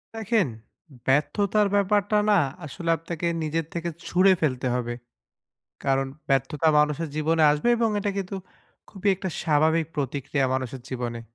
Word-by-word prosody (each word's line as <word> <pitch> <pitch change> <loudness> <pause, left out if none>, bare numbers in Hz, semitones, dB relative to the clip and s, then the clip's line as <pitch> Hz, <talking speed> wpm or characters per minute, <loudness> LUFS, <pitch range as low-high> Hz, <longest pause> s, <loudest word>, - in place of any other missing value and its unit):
দেখেন, 220 -4 +1 0.6
ব্যর্থতার 200 +9 +2
ব্যাপারটা 205 +1 +2
না 205 - +5 0.3
আসলে 165 +3 -5
আপনাকে 165 +1 -4 0.2
নিজের 160 +1 -1
থেকে 170 0 -2 0.2
ছুড়ে 190 +2 +5
ফেলতে 130 -4 0
হবে। 120 -1 -2 0.9
কারণ 135 0 +2 0.2
ব্যর্থতা 135 +3 +1
মানুষের 150 +2 +1
জীবনে 160 +1 +2
আসবে 150 +10 +1
এবং 230 -1 +2
এটা 205 0 -1
কিন্তু 195 0 -4 0.5
খুবই 200 0 -3
একটা 190 +1 -5
স্বাভাবিক 160 +1 +2
প্রতিক্রিয়া 140 0 -1
মানুষের 130 -1 -4
জীবনে। 120 -2 -4
160 Hz, 130 wpm, -25 LUFS, 135-195 Hz, 0.9 s, না